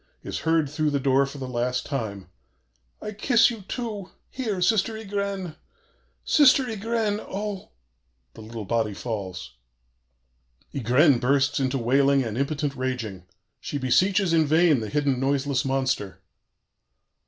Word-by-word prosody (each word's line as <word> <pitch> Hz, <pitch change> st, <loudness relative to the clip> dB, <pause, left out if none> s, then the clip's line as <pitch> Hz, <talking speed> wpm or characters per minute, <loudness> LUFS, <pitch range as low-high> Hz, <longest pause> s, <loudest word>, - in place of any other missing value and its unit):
is -, -, -4 dB
heard 160 Hz, -2 st, +1 dB
through 150 Hz, +2 st, -1 dB
the 145 Hz, -1 st, 0 dB
door 135 Hz, 0 st, +3 dB
for 140 Hz, -, -9 dB
the 130 Hz, -2 st, -5 dB
last 125 Hz, 0 st, -2 dB
time: 110 Hz, -9 st, -4 dB, 0.8 s
'I 210 Hz, -, -4 dB
kiss 230 Hz, +3 st, +3 dB
you, 225 Hz, -3 st, -7 dB
too 210 Hz, -2 st, -5 dB, 0.2 s
here 225 Hz, -7 st, -3 dB
Sister 220 Hz, +4 st, +2 dB
Ygraine! 200 Hz, -5 st, -4 dB, 0.7 s
Sister 275 Hz, -2 st, +5 dB
Ygraine! 220 Hz, -1 st, -1 dB
Oh!' 200 Hz, 0 st, -5 dB, 0.6 s
The -, -, -12 dB
little 110 Hz, -1 st, -7 dB
body 110 Hz, -1 st, -1 dB
falls. 95 Hz, -, -5 dB, 1.2 s
"Ygraine 135 Hz, +2 st, +3 dB
bursts 140 Hz, +3 st, +2 dB
into 135 Hz, 0 st, 0 dB
wailing 135 Hz, +3 st, +3 dB
and 110 Hz, -3 st, -4 dB
impotent 145 Hz, +2 st, -1 dB
raging. 120 Hz, -8 st, -4 dB, 0.3 s
She 145 Hz, -, -4 dB
beseeches 185 Hz, +8 st, +2 dB
in 160 Hz, -2 st, +3 dB
vain 160 Hz, -2 st, +4 dB
the 110 Hz, -2 st, -5 dB
hidden, 145 Hz, -3 st, 0 dB
noiseless 140 Hz, 0 st, 0 dB
monster.... 130 Hz, -7 st, -1 dB
140 Hz, 130 wpm, -25 LUFS, 125-195 Hz, 1.2 s, Sister